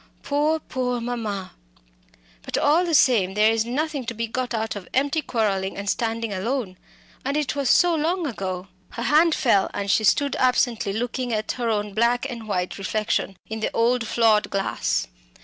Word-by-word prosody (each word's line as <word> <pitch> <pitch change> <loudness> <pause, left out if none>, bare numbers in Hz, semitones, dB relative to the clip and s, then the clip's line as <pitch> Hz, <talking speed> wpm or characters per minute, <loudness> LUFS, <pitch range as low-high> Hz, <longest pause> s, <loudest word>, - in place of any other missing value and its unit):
Poor, 300 +3 +1
poor 250 -4 -2
mamma! 225 -5 -4 0.9
But, - - -3
all 320 +5 +3
the 335 -2 +1
same, 200 -9 +4
there 215 +1 +5
is 225 0 +1
nothing 285 +3 -2
to 235 - -3
be 230 +1 -2
got 250 +2 -3
out 220 -2 -2
of 195 -3 -8
empty 285 +4 +1
quarrelling 200 -7 -1
and 200 0 -5
standing 225 0 -1
alone. 200 -1 -2 0.5
And 280 +3 -1
it 295 -2 -1
was 280 -3 0
so 350 -1 +5
long 330 +3 0
ago." 190 -7 -4 0.3
Her 235 - -4
hand 310 +5 +4
fell, 220 -9 +2
and 200 -1 -1
she 220 - +3
stood 280 +6 +3
absently 245 -4 +2
looking 245 +3 -2
at 215 -1 -1
her 240 -2 -2
own 210 -2 -1
black 235 +4 +2
and 235 -4 -7
white 180 -2 -2
reflection 200 -1 -1
in 220 0 -5
the 220 - -1
old 235 0 +2
flawed 220 -2 +3
glass. 195 0 -1
230 Hz, 180 wpm, -24 LUFS, 210-270 Hz, 0.9 s, there